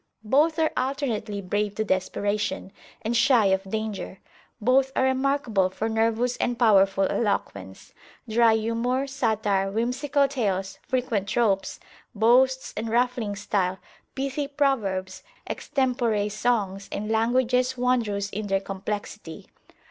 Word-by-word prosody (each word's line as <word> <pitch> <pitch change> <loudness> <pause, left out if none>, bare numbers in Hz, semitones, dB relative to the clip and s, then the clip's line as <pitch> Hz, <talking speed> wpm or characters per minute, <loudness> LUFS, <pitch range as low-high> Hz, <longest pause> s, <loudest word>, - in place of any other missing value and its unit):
Both 295 +8 +3
are 320 -1 +2
alternately 235 -7 -2
brave 205 +2 -2
to 220 - 0
desperation, 205 +1 -1 0.3
and 225 +2 -1
shy 240 -2 +4
of 190 0 -2
danger. 215 -2 -4 0.4
Both 260 +4 +3
are - - +2
remarkable 260 -7 +1
for 215 +4 -3
nervous 225 +2 +1
and 245 -1 -1
powerful 195 -4 +4
eloquence; 100 - -3 0.3
dry 225 0 +4
humour, 230 +4 0
satire, 210 -7 0
whimsical 265 +6 +1
tales, 195 -8 -2
frequent 240 -6 -1
tropes; 215 -4 0 0.4
boasts, 255 +4 +3
and 225 +1 -3
ruffling 240 -3 0
style; 195 -2 -1 0.4
pithy 275 +1 -2
proverbs, 215 -10 -1 0.3
extempore 240 -6 0
songs, 205 -3 -1
and 210 +1 -3
languages 250 +3 +1
wondrous 225 -5 0
in 210 +1 -4
their 195 -1 +1
complexity. 195 -3 -6
220 Hz, 120 wpm, -25 LUFS, 200-255 Hz, 0.4 s, shy